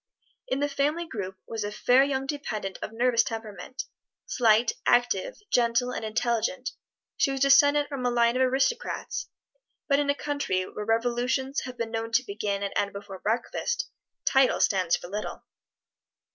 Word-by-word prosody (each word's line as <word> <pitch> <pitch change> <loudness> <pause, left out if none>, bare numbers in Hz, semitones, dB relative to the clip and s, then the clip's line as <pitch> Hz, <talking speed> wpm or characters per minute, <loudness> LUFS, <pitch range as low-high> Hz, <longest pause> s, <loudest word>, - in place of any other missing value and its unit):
In 265 +2 -1
the 290 - +2
family 290 +4 0
group 190 - -5
was 225 -2 -4
a 205 - -3
fair 250 +5 +4
young 270 -1 -1
dependent 215 -9 -4
of - - -4
nervous 235 +1 +3
temperament 225 +3 -5 0.4
slight, 225 -1 +3 0.2
active, 245 - +2
gentle 240 +1 +2
and - - -4
intelligent. 235 +3 -1 0.5
She - - +3
was 270 -1 -2
descendent 285 +1 +5
from 275 -3 -5
a 245 - +2
line 235 0 +3
of 255 - +1
aristocrats, 265 - 0 0.6
but 280 -1 +3
in 290 -1 0
a 285 - +3
country 285 -12 -1
where 210 +3 -6
revolutions 245 +4 0
have 250 -1 -7
been 230 -1 -3
known 225 0 -3
to 250 +3 +3
begin 200 -1 -2
and 200 - -3
end 200 0 0
before 200 -1 -8
breakfast, 480 - -1 0.3
titles 265 -1 +4
stand 185 -4 -1
for - - -9
little. 210 +3 -5
245 Hz, 160 wpm, -27 LUFS, 215-275 Hz, 0.6 s, descendent